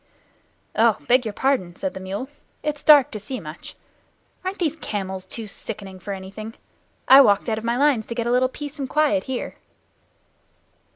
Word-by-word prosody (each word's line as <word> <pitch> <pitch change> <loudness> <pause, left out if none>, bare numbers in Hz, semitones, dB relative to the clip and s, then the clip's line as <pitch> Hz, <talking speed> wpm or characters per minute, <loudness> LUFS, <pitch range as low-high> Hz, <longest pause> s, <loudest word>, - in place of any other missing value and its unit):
"Oh, 225 -1 +4
beg 250 0 +4
your 210 - -4
pardon," 205 -10 0
said 280 +4 -3
the - - -7
mule. 195 +7 -5 0.4
"It's 300 -1 -2
too - - -26
dark 290 -4 +8
to 215 - -5
see 250 +6 -6
much. - - -10 0.7
Aren't 375 +2 -3
these 320 -5 0
camels 190 -7 -4
too 225 +3 -6
sickening 200 -2 -8
for 195 +3 -7
anything? 200 +3 -7 0.5
I 270 +1 +10
walked 205 -4 +3
out 220 -1 0
of - - -11
my 235 +1 0
lines 275 -6 +2
to 235 - -5
get 235 -1 -2
a 240 - 0
little 255 +1 +3
peace 290 +2 -8
and 270 -2 -3
quiet 300 -1 +2
here." 260 -2 -4
235 Hz, 185 wpm, -23 LUFS, 205-275 Hz, 0.7 s, I